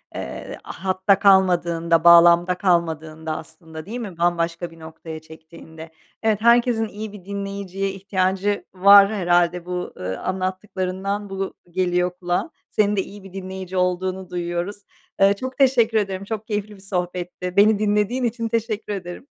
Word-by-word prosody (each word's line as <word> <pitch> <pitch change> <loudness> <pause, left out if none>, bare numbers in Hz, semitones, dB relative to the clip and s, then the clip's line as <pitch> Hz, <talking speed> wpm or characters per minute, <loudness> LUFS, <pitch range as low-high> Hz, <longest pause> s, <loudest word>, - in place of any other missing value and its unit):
Eee, 65 - -6
hatta 190 +1 0
kalmadığında, 170 -4 +3
bağlamda 170 +1 +7
kalmadığında 160 -3 -1
aslında 160 -2 -10
değil 230 +6 -6
mi, 200 -8 -7
bambaşka 170 0 0
bir 165 - -16
noktaya 160 0 -9
çektiğinde. 160 0 -13 0.3
Evet, 215 -2 +1
herkesin 235 -1 +4
iyi 215 0 -7
bir 195 -4 -12
dinleyiciye 195 -1 -4
ihtiyacı 195 +1 -1
var 200 +1 +7
herhâlde. 175 -2 +1
Bu, 180 0 -4
ııı, 95 +1 -4
anlattıklarından 190 +1 -3
bu 195 0 -4 0.2
geliyor 180 0 0
kulağa. 175 - -1 0.2
Senin 210 -1 +1
de 195 - +1
iyi 200 +1 -11
bir 195 -1 -13
dinleyici 190 -1 -6
olduğunu 185 +1 -1
duyuyoruz. 175 +3 -3 0.4
Iıı, 195 +1 +6
çok 260 +5 -6
teşekkür 245 -5 +3
ederim, 195 -2 -1
çok 215 +1 -5
keyifli 210 -1 -3
bir 195 - -17
sohbetti. 180 -1 -4
Beni 205 +1 +5
dinlediğin 210 +4 +1
için 230 -1 -1
teşekkür 225 -2 -2
ederim. 180 +4 -7
190 Hz, 140 wpm, -22 LUFS, 175-205 Hz, 0.4 s, bağlamda